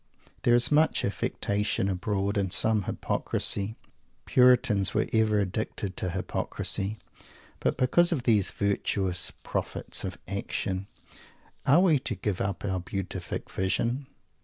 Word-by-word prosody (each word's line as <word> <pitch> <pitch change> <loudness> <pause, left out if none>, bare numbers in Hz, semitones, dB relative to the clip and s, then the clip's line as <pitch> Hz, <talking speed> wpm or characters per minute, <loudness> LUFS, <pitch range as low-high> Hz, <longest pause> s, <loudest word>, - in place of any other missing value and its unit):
There 120 - +4
is 120 +3 +3
much 155 +2 +3
affectation 100 0 -1
abroad, 100 +1 -1
and 100 -3 0
some 110 -1 +2
hypocrisy. 100 +2 +1 0.5
Puritans 120 -6 +4
were - - +2
ever 110 -2 +3
addicted 100 0 -3
to 90 - -1
hypocrisy. 95 +2 -2 0.6
But - - 0
because 170 +8 +3
of 145 -8 -1
these 110 -6 +3
"virtuous" 100 -2 0
prophets - - -2
of - - -4
"action," 95 +1 -3 0.8
are 145 +6 +6
we 165 -7 +4
to - - -3
give 100 -4 -2
up 100 0 -2
our 95 -2 -1
Beatific 90 0 -5
Vision? 120 +8 -1
105 Hz, 125 wpm, -28 LUFS, 95-120 Hz, 0.8 s, are